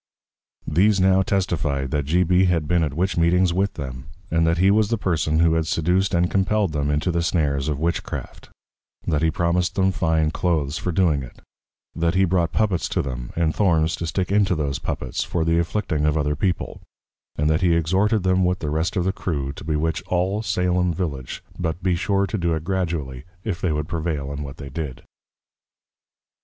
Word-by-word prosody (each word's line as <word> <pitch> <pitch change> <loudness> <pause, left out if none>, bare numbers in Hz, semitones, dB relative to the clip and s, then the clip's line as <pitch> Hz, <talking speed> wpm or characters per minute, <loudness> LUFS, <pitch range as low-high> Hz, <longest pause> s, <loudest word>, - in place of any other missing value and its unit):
These 95 +6 +3
now 95 0 +4
testified, 75 -9 -1
that 75 -2 0
G. 85 +5 +2
B. 90 +2 +3
had 85 -4 +1
been 85 0 +2
at 75 -3 -2
Witch 90 +2 0
meetings 85 +1 +3
with 95 +3 0
them; 65 -3 -6 0.3
and 80 0 +2
that 85 +1 +2
he 95 +3 +4
was 105 0 +3
the 115 - +1
Person 80 -5 0
who 85 -1 +4
had 80 -1 +1
Seduc'd, 90 +4 +1
and 85 +1 +3
Compell'd 100 0 +1
them 75 -1 -1
into 75 +5 0
the 85 0 0
snares 75 -4 0
of 75 - -1
Witchcraft; 85 +3 -4 0.6
That 75 -2 0
he 80 - +3
promised 85 +2 0
them 95 -1 +3
Fine 80 -3 +1
Cloaths, 80 -5 -1
for 90 - -2
doing 80 -5 +2
it; 65 - -11 0.6
that 85 +1 0
he 95 +1 +4
brought 85 -2 +1
Poppets 100 -6 0
to - - 0
them, 65 -2 -5
and 80 -2 +1
Thorns 85 -5 +2
to 85 - -3
stick 90 +3 -2
into 100 -3 +3
those 70 -3 -2
Poppets, 65 - -3
for 80 -2 -1
the 80 +1 +2
Afflicting 85 -3 -1
of 75 +1 +2
other 75 0 0
People; 90 +4 -2 0.5
and 75 - 0
that 80 - +1
he 85 -2 +3
exhorted 95 +6 +2
them 95 0 +2
with 90 0 +1
the 75 -5 -4
rest 80 +4 -1
of 90 - +1
the 95 +1 0
Crew, 70 -6 -3
to - - -10
Bewitch 80 +1 -1
all 95 +4 0
Salem 90 -4 0
Village, 70 -8 -4 0.2
but 85 0 -3
besure 95 +2 +1
to 100 +2 -3
do 85 -2 +1
it 80 - -4
Gradually, 80 -8 -2 0.2
if 95 -5 -3
they 90 - +1
would 75 0 -2
prevail 80 -4 -3
in 70 - -5
what 70 -1 -7
they 70 -2 -8
did. 75 -1 -6
85 Hz, 200 wpm, -23 LUFS, 75-95 Hz, 0.6 s, now